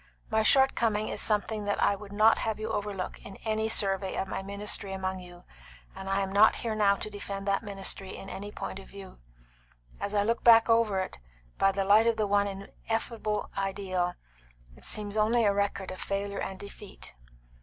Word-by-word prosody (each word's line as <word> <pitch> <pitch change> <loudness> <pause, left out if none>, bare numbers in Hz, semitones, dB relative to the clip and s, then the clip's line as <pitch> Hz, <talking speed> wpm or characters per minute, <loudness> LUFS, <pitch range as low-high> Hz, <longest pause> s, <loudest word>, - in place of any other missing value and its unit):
My 220 0 +3
shortcoming 225 -3 +3
is - - -1
something 210 0 0
that 205 - -1
I 200 - +3
would 200 0 -11
not 215 +2 +4
have 220 -1 -2
you 220 +1 -3
overlook 205 -3 -4
in 195 - -9
any 220 0 0
survey 195 -2 +3
of 195 - -2
my - - -4
ministry 200 0 -1
among 190 0 -3
you; 175 -1 -13 0.5
and 190 0 -7
I 195 +1 +1
am 195 0 -3
not 210 +2 +6
here 230 -2 -3
now 205 -2 +3
to 215 - -4
defend 200 -1 -6
that 195 0 +1
ministry 195 -2 -1
in 195 - -9
any 205 +1 -7
point 195 - -6
of 195 - -12
view. 195 -1 -12 0.8
As 210 - -3
I 205 - +3
look 230 +3 -1
back 230 -1 +7
over 225 -4 +3
it, 185 - -6 0.4
by 195 - +4
the 195 0 -1
light 215 +3 +5
of 230 -1 +2
the 215 - +1
one 200 0 +2
ineffable 215 +2 -4
ideal, 190 -2 -2 0.6
it - - -17
seems 210 0 -1
only 225 +2 +3
a 200 - +3
record 200 -1 -1
of 185 - -8
failure 200 0 -3
and 190 - -4
defeat." 200 - -10
200 Hz, 195 wpm, -29 LUFS, 195-215 Hz, 0.8 s, back